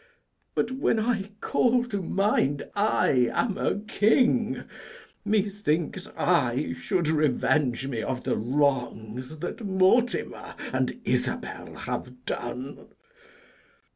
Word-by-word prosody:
But 235 - +1
when 260 -3 +1
I 215 -3 0
call 245 0 +3
to 205 -5 -3
mind 185 -7 +1
I 140 - +3
am 215 -5 0
a 205 - 0
king, 230 +2 +3 0.6
Methinks 200 -6 0
I - - +2
should 115 - -1
revenge 150 -4 +2
me 125 -5 -2
of 125 +2 -3
my - - +1
wrongs, 130 0 -1
That 175 +8 -5
Mortimer 200 +5 +1 0.2
and - - 0
Isabel - - -2
have 125 0 -5
done. 125 +3 -5
165 Hz, 105 wpm, -27 LUFS, 130-215 Hz, 0.6 s, call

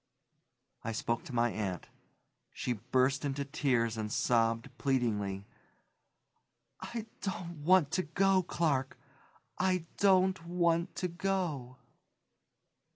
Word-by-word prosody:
I 115 - -3
spoke 115 +1 -1
to 125 - -7
my 120 0 +3
aunt. 95 -5 -3 0.7
She 125 - -2
burst 130 +5 +1
into 140 0 -2
tears 125 -6 +1
and 105 -1 -3
sobbed 115 +3 +1
pleadingly. 105 -7 0 1.3
"I 230 -2 -5 0.2
don't 175 -4 -4
want 175 -3 +5
to 185 - +1
go, 190 +3 +2
Clark, 150 -7 0 0.6
I 185 -2 +1
don't 190 -2 +4
want 170 0 +1
to 180 - -1
go!" 170 -8 -2
140 Hz, 105 wpm, -32 LUFS, 115-180 Hz, 1.3 s, want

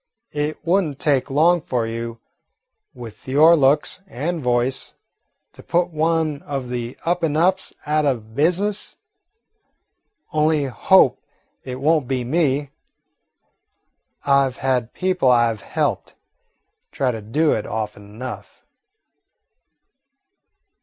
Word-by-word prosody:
It 150 +1 -2
would 190 +4 +3
n't 145 -4 -6
take 140 -3 +1
long 165 +5 +3
for 125 -5 -1
you, 115 0 -5 0.7
with 120 -2 -11
your 155 +6 +6
looks 145 +4 +2
and 160 +4 -3
voice, 125 +1 -1 0.6
to - - -13
put 175 +1 0
one 160 -2 0
of 135 -4 -5
the 120 0 -4
'up 175 +1 +1
and 155 -2 0
ups' 185 +3 +2
out 150 0 +1
o' 135 - +3
the - - -9
business. 175 - 0 1.4
Only 155 -1 +2
hope 130 -3 +3 0.4
it 130 -1 -6
won't 150 -1 +2
be 130 -1 -1
me. 145 0 0 1.5
I 140 -1 +4
've 125 - -14
had 125 -3 0
people 185 -7 +1
I 120 -2 +4
've 105 - -12
helped - - -2 0.8
try 130 -2 0
to 115 -2 -6
do 145 +9 +1
it 110 - -3
often 105 -1 -4
enough." 115 +5 -9
140 Hz, 125 wpm, -21 LUFS, 125-160 Hz, 1.5 s, your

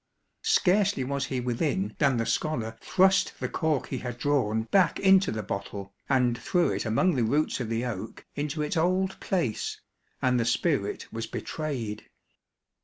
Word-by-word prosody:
Scarcely 195 -5 +3
was 140 +1 -2
he 130 - -2
within 140 +10 -1
than 140 -5 +3
the 115 - 0
scholar 115 -8 -1
thrust 190 +1 +3
the - - -1
cork 155 -7 -1
he 130 - -3
had 125 -1 -5
drawn 125 -6 +1
back 175 - +2
into 190 0 +5
the 110 -1 -3
bottle, 100 0 -5 0.2
and 125 -3 +3
threw 170 +9 +1
it - - -2
among 115 +12 +2
the 125 - +2
roots 145 +7 +1
of 120 -3 -3
the 115 +2 -1
oak 110 -3 -6
into 150 +1 -2
its 150 - -2
old 185 +3 +1
place, 165 - -1 0.4
and 125 -1 +2
the - - +2
spirit 120 - 0
was 115 0 -4
betrayed. 125 -9 -4
135 Hz, 165 wpm, -27 LUFS, 115-165 Hz, 0.4 s, into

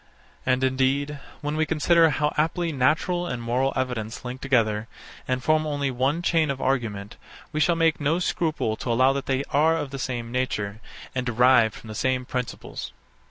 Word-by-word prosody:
And 130 0 +2
indeed, 135 +2 +1 0.2
when 150 +1 -2
we 155 0 +1
consider 165 +1 +4
how 150 -1 0
aptly 165 +2 0
natural 160 +6 +1
and 125 - -3
moral 125 +3 0
evidence 125 -3 -3
link 125 +1 -6
together, 110 -5 +1 0.4
and 130 0 -1
form 155 +1 +2
only 145 -2 -1
one 135 +7 0
chain 165 -3 +2
of 135 -1 -2
argument, 115 -7 -2 0.3
we 155 - -2
shall 170 +2 +3
make 165 -1 +2
no 150 +4 +2
scruple 160 -10 -1
to 120 - -3
allow 130 +3 +4
that 135 -1 -4
they 135 0 +1
are 160 +3 +3
of 145 -4 -4
the 135 - -5
same 120 -2 -3
nature, 110 -4 -2 0.3
and 125 - -1
derived 120 -1 +4
from - - -12
the 110 - -6
same 130 +3 0
principles. 125 -1 -5
130 Hz, 180 wpm, -25 LUFS, 125-155 Hz, 0.4 s, consider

